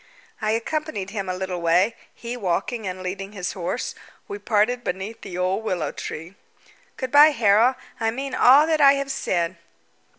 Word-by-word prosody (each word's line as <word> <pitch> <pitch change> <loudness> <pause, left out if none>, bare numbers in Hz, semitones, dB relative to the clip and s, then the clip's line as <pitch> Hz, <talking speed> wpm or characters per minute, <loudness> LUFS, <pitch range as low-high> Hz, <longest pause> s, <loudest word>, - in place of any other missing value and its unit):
I 215 - 0
accompanied 230 -4 -3
him 195 -3 -4
a 185 - -2
little 185 -1 -4
way, 180 +7 +3 0.2
he 235 +1 -6
walking 205 +1 -2
and 185 0 -5
leading 195 +2 -5
his 185 -3 -4
horse. 185 +6 -3 0.3
We 405 0 -6
parted 240 - +1
beneath 190 +4 -5
the 180 - -7
old 185 +4 0
willow 185 -5 -2
tree. 165 +4 -7 0.6
"Good 260 -1 -4
bye, 295 +2 +8
Harold. 230 -1 +3 0.2
I 225 -1 +1
mean 270 +4 -4
all 280 +5 +6
I 300 -4 +5
have 275 0 -2
said." 180 -9 -1
215 Hz, 165 wpm, -23 LUFS, 185-255 Hz, 0.6 s, bye